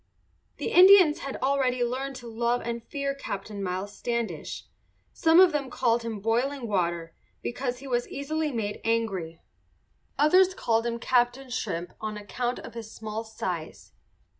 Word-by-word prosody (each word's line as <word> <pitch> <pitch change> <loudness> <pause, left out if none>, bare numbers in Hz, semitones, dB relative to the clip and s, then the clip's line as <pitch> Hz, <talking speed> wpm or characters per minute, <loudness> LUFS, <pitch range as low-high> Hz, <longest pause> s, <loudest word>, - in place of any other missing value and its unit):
The - - -3
Indians 365 -4 +8
had 275 - -5
already 260 -2 +2
learned 265 +3 -2
to 245 -2 -9
love 235 +2 0
and 235 0 -4
fear 280 +1 -3
Captain 205 -6 -6
Miles 190 +2 -3
Standish. 235 -2 -3 0.5
Some 325 0 +5
of 370 -2 +8
them 285 -3 -2
called 235 -2 +1
him 230 -2 -4
"Boiling 240 +5 0
Water" 170 -4 -1 0.3
because 250 0 -3
he 275 +2 -10
was 245 -2 0
easily 305 +2 -2
made 210 -4 -3
angry. 195 -8 -1 0.7
Others 365 +6 +5
called 230 -5 +1
him 235 0 -2
"Captain 245 +2 +1
Shrimp," 175 -8 -3
on 215 -1 -4
account 240 +4 -3
of - - -9
his 225 -2 -8
small 220 0 -5
size. 180 -7 -5
240 Hz, 150 wpm, -27 LUFS, 215-275 Hz, 0.7 s, Indians